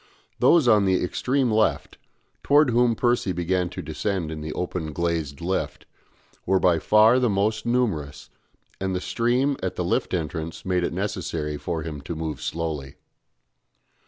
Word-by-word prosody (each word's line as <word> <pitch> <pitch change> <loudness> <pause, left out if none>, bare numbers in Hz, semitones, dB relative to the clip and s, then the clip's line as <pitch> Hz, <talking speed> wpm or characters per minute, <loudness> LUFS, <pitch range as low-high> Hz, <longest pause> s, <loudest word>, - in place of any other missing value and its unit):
Those 165 -6 +5
on 105 -3 +5
the 95 -1 +2
extreme 130 +7 0
left, 110 0 0 0.4
towards 145 -2 +4
whom 120 0 +3
Percy 120 -5 +1
began 90 +1 0
to - - -7
descend 95 -6 -3
in 80 -1 -6
the 75 0 -5
open 90 -3 -4
glazed 85 -3 -2
lift, 95 +3 -3 0.6
were 95 0 +2
by 85 -3 +3
far 110 +7 +5
the 125 -2 +2
most 105 +3 0
numerous, 105 - -1 0.5
and 95 -1 -2
the - - 0
stream 125 +7 0
at 95 - -3
the 90 - -2
lift 90 - 0
entrance 80 0 -4
made 90 -1 +1
it - - -1
necessary 85 -6 -3
for 80 +1 -4
him 75 -3 -6
to 80 +4 -6
move 80 -3 -4
slowly. 80 -5 -4
90 Hz, 160 wpm, -24 LUFS, 80-110 Hz, 0.6 s, Those